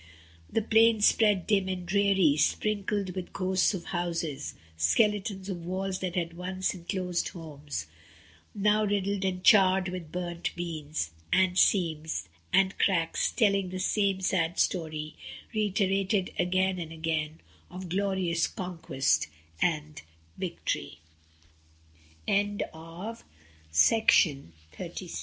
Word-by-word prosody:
The 225 - +1
plain 225 0 +4
spread 210 -3 +4
dim 195 -3 +2
and 180 -1 -3
dreary, 195 -5 +3
sprinkled 205 +3 0
with 180 0 -6
ghosts 190 +1 +1
of 175 - -6
houses, 170 -5 -3 0.2
skeletons 190 - +1
of 180 -4 -5
walls 185 +2 -3
that 185 -2 -3
had 170 -2 -2
once 185 +1 -2
enclosed 180 0 -2
homes, 150 - -6 0.7
now 210 +1 +3
riddled 200 -1 0
and 185 -1 -2
charred 190 -4 +5
with 180 -4 -7
burnt 175 -1 -4
beams, 155 - -4 0.2
and 185 -1 +3
seams, 160 - +2 0.2
and 195 0 +3
cracks, 170 -4 +1
telling 200 -5 +2
the 185 - -5
same 195 0 +1
sad 175 -2 0
story, 155 -3 -1 0.4
reiterated 195 -2 +1
again 185 +1 +1
and 165 -2 -6
again, 160 -1 -2 0.3
of 180 +1 -7
glorious 185 -2 0
co 180 -2 -6
185 Hz, 100 wpm, -28 LUFS, 170-195 Hz, 0.7 s, charred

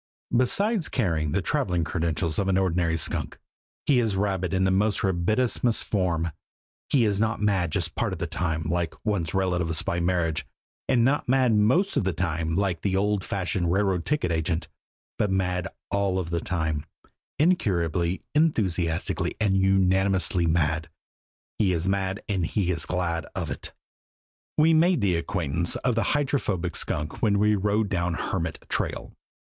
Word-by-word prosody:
Besides 195 - +2
carrying 80 - 0
the - - 0
traveling 90 -2 0
credentials 80 0 -1
of 100 - 0
an 95 -1 +2
ordinary 90 -3 +1
skunk, 80 - -2 0.5
he 135 -4 +4
is 110 -4 0
rabid 95 -3 -1
in 95 -1 +1
the 95 - +3
most 105 +3 +2
rabidissimus 110 +6 +1
form. 85 -5 0 0.6
He 130 -5 +3
is 100 -2 +1
not 110 +1 0
mad 95 -5 +1
just 85 +1 -1
part 115 -4 -1
of 95 - -4
the 85 - -2
time, 80 -1 -2
like 85 +1 -1
one's 95 -6 -1
relatives 90 -4 0
by 85 -3 -1
marriage 85 -3 0 0.5
and 120 -3 +4
not 135 -1 +1
mad 130 -3 +4
most 125 - +3
of - - +2
the 95 -1 0
time, 80 -1 -1
like 95 -4 0
the 95 -2 0
old 100 0 +1
fashioned 90 -3 -1
railroad 95 -2 +1
ticket 150 - 0
agent 80 +1 -1 0.5
but 105 - +2
mad 90 -1 0 0.2
all 100 -2 +1
the 85 0 -2
time 80 -5 -2 0.5
incurably, 90 - +1
enthusiastically 95 - 0
and 105 -3 +2
unanimously 95 -2 +2
mad! 80 -1 +1 0.7
He 95 -4 +3
is 85 +2 -1
mad 95 0 -1
and 95 -6 0
he 95 -3 0
is 85 - -3
glad 85 -2 -1
of - - -3
it. - - -5 0.9
We 160 +1 +5
made 165 -2 +4
the 95 -4 +2
acquaintance 85 0 -1
of 125 - 0
the 115 +5 +1
Hydrophobic 105 - -1
Skunk 75 -1 -1
when 105 -2 +3
we 105 +1 +3
rode 105 +1 +1
down 90 -3 -1
Hermit 80 -2 -3
Trail. - - -3
95 Hz, 160 wpm, -26 LUFS, 85-105 Hz, 0.9 s, We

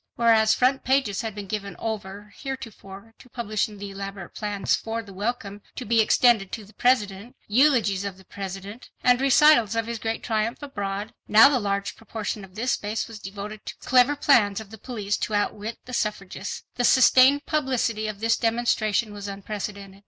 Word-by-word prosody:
Whereas 225 -2 +4
front 260 +2 +2
pages 260 -7 +1
had 220 -3 -5
been 205 -1 -6
given 200 -1 -5
over 205 -2 -6
heretofore 225 -6 -8
to 250 - -17
publishing 215 -3 -2
the 200 0 -7
elaborate 195 -2 -7
plans 205 -2 -1
for 225 0 -4
the 200 -2 -13
welcome 205 0 -4
to 250 - -6
be 225 +1 +4
extended 220 -3 +3
to 220 - -5
the 210 - -18
President, 215 -3 0
eulogies 220 -5 +3
of 200 -2 -5
the 190 - -18
President, 195 +4 -8
and 250 0 +4
recitals 275 -5 +5
of 225 -1 0
his 230 -1 -4
great 225 +1 -3
triumph 225 +4 -1
abroad, 205 -5 -4
now 225 +6 +8
the 270 -3 +1
large 200 -2 -2
proportion 215 -1 -5
of 190 -1 -14
this 245 +4 -1
space 210 +2 -2
was 225 -2 -10
devoted 205 +2 -8
to - - -5
clever 255 +3 +3
plans 225 -9 +3
of 220 -2 -11
the 220 - -11
police 210 -5 -3
to 215 - -2
outwit 210 +2 -2
the 250 - -9
suffragists. 210 -4 -3
The 245 - 0
sustained 260 +3 +6
publicity 255 -7 0
of 210 -1 -6
this 230 0 +2
demonstration 225 -2 0
was 205 0 -7
unprecedented. 200 0 -6
215 Hz, 180 wpm, -25 LUFS, 200-240 Hz, -, now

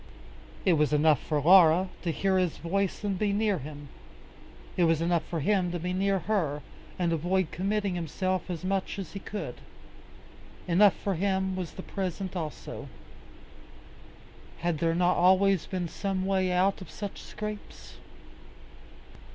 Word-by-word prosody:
It 185 - +5
was 150 -2 +2
enough 150 -1 +4
for 150 -2 -1
Laura 175 +2 +6
to 175 - -2
hear 190 +4 +1
his 180 -3 0
voice 195 +4 -1
and 195 -3 -1
be 210 -1 +1
near 205 -2 +1
him. 145 0 -9 0.9
It 175 - +3
was 165 -1 +3
enough 170 -1 +1
for 165 -3 -3
him 185 +1 +1
to - - -1
be 180 +2 -3
near 195 +1 +1
her, 165 -7 -1 0.3
and 175 -2 +1
avoid 175 +2 0
committing 200 +1 -1
himself 185 +2 -2
as 180 0 -4
much 195 +1 -1
as 195 -4 -6
he 200 - -5
could. 205 +2 -6 1.1
Enough 190 +3 +5
for 200 - -2
him 190 +1 0
was 180 -3 -5
the 190 - -8
present 190 -1 -4
also. 160 -4 -6 1.7
Had 170 -3 0
there 165 0 +1
not 180 +1 +2
always 190 0 +4
been 180 -2 -2
some 190 +1 -2
way 190 -1 +1
out 190 +2 +2
of 185 - -9
such 205 -2 -6
scrapes? 210 -1 -8
185 Hz, 150 wpm, -28 LUFS, 170-195 Hz, 1.7 s, Laura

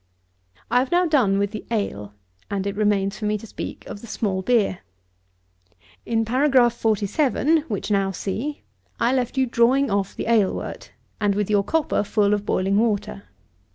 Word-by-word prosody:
I 245 - +5
have 255 +1 -1
now 355 +1 +3
done 255 - +3
with 200 0 0
the 215 - -6
ale, 105 - -3 0.3
and 200 -1 -2
it 200 0 -2
remains 205 -1 +1
for 215 - -4
me 210 0 +1
to 210 - -11
speak - - -7
of 205 - -8
the 235 - -10
small 200 -3 -2
beer. 205 -3 +1 1.3
In 225 -1 +1
Paragraph 255 0 +3
47 255 +8 +1
(which 210 -1 -3
now 195 -1 +2
see) 225 +10 -4 0.4
I 235 +2 +2
left 255 0 -1
you 265 - +3
drawing 245 +2 +2
off 200 -1 -1
the - - -4
ale 220 -5 +3
wort, - - -7 0.3
and 205 -2 +1
with 210 0 -1
your 205 -1 +3
copper 315 -1 0
full 205 0 +2
of 205 0 -2
boiling 195 +2 +1
water. 210 - -1
215 Hz, 175 wpm, -23 LUFS, 200-245 Hz, 1.3 s, I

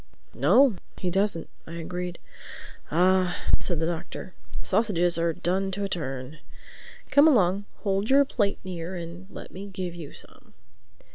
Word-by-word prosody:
"No, 260 -7 +5 0.2
he 180 - -1
doesn't," 195 -2 +1 0.2
I 165 - -8
agreed. 175 +1 -4 0.7
"Ah," 185 +2 +3 0.2
said 175 -4 0
the 160 - +1
Doctor. 170 -1 -5 0.3
"The - - -8
sausages 175 -6 +2
are 170 0 +2
done 185 +4 0
to 200 +2 -2
a 200 - -1
turn. 135 -3 -4 0.7
Come 285 +2 +7
along—hold 200 - +1
your 280 +1 +6
plate 205 -6 0
near 180 -1 -5
and 175 +2 -7
let - - -9
me 195 +2 -7
give 185 -3 -4
you 165 -4 -8
some." - - -13
180 Hz, 145 wpm, -27 LUFS, 170-200 Hz, 0.7 s, Come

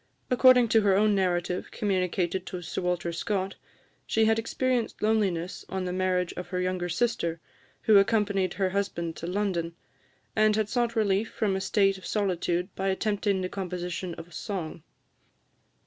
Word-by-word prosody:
According 250 -1 +6
to 225 0 +5
her 200 -2 +3
own 210 +1 +4
narrative, 180 -2 0
communicated 185 -3 -1
to 180 -1 -5
Sir 175 - -4
Walter 175 -1 -1
Scott, 195 +2 -2 0.5
she 220 0 +3
had 220 0 +3
experienced 245 +1 -1
loneliness 195 -5 0
on 190 -1 -2
the 180 - -2
marriage 185 -1 0
of 180 - -6
her 180 0 -3
younger 180 -1 -1
sister, 170 -4 0 0.4
who 210 -2 +7
accompanied 200 -3 +1
her 190 -2 0
husband 170 -4 -2
to 170 - -5
London, 180 -3 -1 0.6
and 215 -1 +4
had 215 -1 0
sought 240 0 0
relief 210 0 +1
from 200 -3 0
a 190 - -2
state 195 -1 +2
of - - -9
solitude 180 -2 -1
by 195 - -2
attempting 200 0 0
the 185 - -1
composition 180 -2 -4
of 165 +1 -11
song. 180 -7 -5
190 Hz, 160 wpm, -27 LUFS, 180-210 Hz, 0.6 s, who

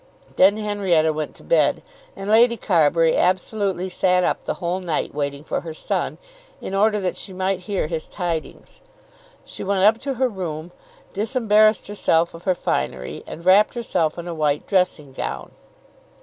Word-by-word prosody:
Then 200 +3 +5
Henrietta 195 -7 +1
went 155 0 -4
to - - -16
bed, - - +2 0.3
and 195 - -7
Lady 235 +2 +5
Carbury 165 -4 +3
absolutely 185 0 0
sat 180 0 +2
up - - 0
the - - -2
whole 175 +2 -2
night 170 -5 -2
waiting 140 0 -3
for - - -3
her 160 -2 -8
son, - - -2 0.4
in - - -7
order 210 +2 +3
that 185 -2 -2
she 190 - -7
might 190 0 -1
hear 200 -5 0
his 160 0 -4
tidings. 170 -4 -5 0.6
She - - -7
went 195 -1 0
up 220 +3 +5
to 275 +1 -3
her 260 +1 +2
room, 175 -6 -5 0.4
disembarrassed 215 0 +3
herself 170 -5 +1
of 165 +1 -12
her 185 -2 +2
finery, 65 - -3
and 170 - -9
wrapped 200 +5 +5
herself 175 -10 -1
in 170 0 -6
a 170 - -4
white 150 -2 0
dressing 180 -8 0
gown. - - -5
185 Hz, 165 wpm, -22 LUFS, 165-205 Hz, 0.6 s, Then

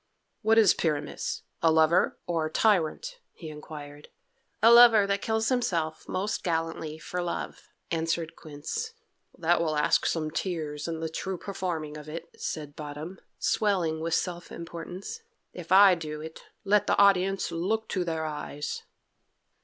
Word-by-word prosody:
"What 220 +1 +3
is 215 -5 +7
Pyramus 150 -3 -2 0.2
a 165 - +5
lover 160 +2 +3
or 165 -2 0
a - - -10
tyrant?" 220 - +1
he 160 - -9
inquired. 150 -1 -10 0.6
"A 230 - +8
lover 235 -3 +8
that 200 0 0
kills 220 0 0
himself 170 -11 -1
most 200 +3 -2
gallantly 165 -2 -2
for 180 +3 -4
love," 175 -1 -5 0.2
answered 165 0 -1
Quince. 155 - -6 0.4
"That 170 0 +2
will 155 -2 0
ask 150 0 +2
some 155 -2 -1
tears 155 -4 -3
in 165 -1 -4
the 165 - -1
true 185 +3 -4
performing 170 -6 -4
of 150 0 -11
it," 165 +2 -7
said 150 -2 -5
Bottom, 150 +5 -7 0.2
swelling 180 -7 +1
with 165 +1 0
self 175 -1 -3
importance. 175 - -7 0.3
"If 175 -1 -9
I 195 0 +8
do 155 -3 -4
it, 160 +1 -9 0.2
let 205 0 +3
the - - +2
audience 195 -1 +3
look 210 +7 -1
to 185 - 0
their 160 -2 -2
eyes." 150 -1 -5
170 Hz, 150 wpm, -28 LUFS, 155-195 Hz, 0.6 s, A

